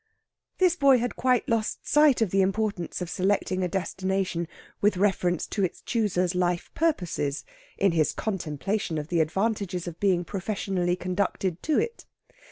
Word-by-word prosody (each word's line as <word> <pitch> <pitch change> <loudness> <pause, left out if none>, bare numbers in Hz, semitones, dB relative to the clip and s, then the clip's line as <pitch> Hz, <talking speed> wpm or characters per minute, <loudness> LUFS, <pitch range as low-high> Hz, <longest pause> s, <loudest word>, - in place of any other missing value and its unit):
This 365 -2 +4
boy 275 -6 +5
had 245 0 -2
quite 255 -1 +2
lost 225 -2 -1
sight 295 -6 +5
of 200 - -2
the 195 - +3
importance 195 -3 -1
of 175 - -6
selecting 190 -1 0
a - - +1
destination 190 -1 -2 0.3
with 205 -2 +3
reference 180 -3 +1
to 200 - -1
its 185 - -2
chooser's 190 -6 0
life 175 -1 0
purposes, 175 - -1 0.3
in 195 -1 +3
his 160 -2 +2
contemplation 190 -1 -2
of 150 +1 -4
the 170 - +1
advantages 185 +2 -1
of 170 -1 -7
being 185 -3 +2
professionally 190 -2 -1
conducted 185 -1 -2
to 310 - +1
it. 465 - -2
190 Hz, 155 wpm, -26 LUFS, 175-215 Hz, 0.3 s, boy